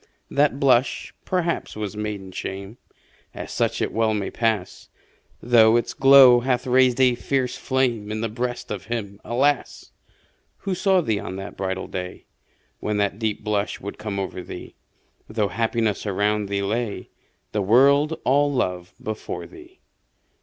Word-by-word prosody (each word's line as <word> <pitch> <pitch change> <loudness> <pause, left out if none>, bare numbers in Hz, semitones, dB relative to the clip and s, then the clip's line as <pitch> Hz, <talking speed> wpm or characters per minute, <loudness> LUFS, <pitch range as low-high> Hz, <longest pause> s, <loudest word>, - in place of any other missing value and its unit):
That 140 -1 +2
blush, 130 -2 +2
perhaps, 175 -2 -1
was 105 -1 -4
maiden 105 -3 -5
shame 95 +5 -6 0.6
As - - -7
such - - 0
it - - -3
well 110 -1 +1
may 100 -2 -3
pass 110 -5 -2 0.5
Though 115 -1 +6
its 120 - -2
glow 135 -2 +8
hath 125 +1 0
raised 130 0 +3
a 130 -2 +5
fiercer 125 +1 -2
flame 120 -6 0
In 110 0 -3
the 115 - 0
breast 120 +2 -4
of 100 -2 -5
him, 105 -3 -5
alas! 135 +4 0 0.7
Who 195 - -2
saw 190 0 +3
thee 110 -9 -1
on 95 - -6
that 95 +1 -7
bridal 95 -1 -3
day, 90 0 -6 0.5
When 105 0 -2
that 100 0 0
deep 110 -2 -2
blush 105 -1 -1
would 100 - -8
come 105 -2 -4
o'er 95 -1 -4
thee, - - -9 0.6
Though 105 -2 0
happiness 110 +1 -1
around 105 +1 0
thee 100 0 -1
lay, 110 +1 -3 0.4
The 105 - -1
world 140 +9 +4
all 145 +3 +3
love 90 -9 -2
before 110 0 -5
thee. 365 0 -15
110 Hz, 155 wpm, -23 LUFS, 100-130 Hz, 0.7 s, glow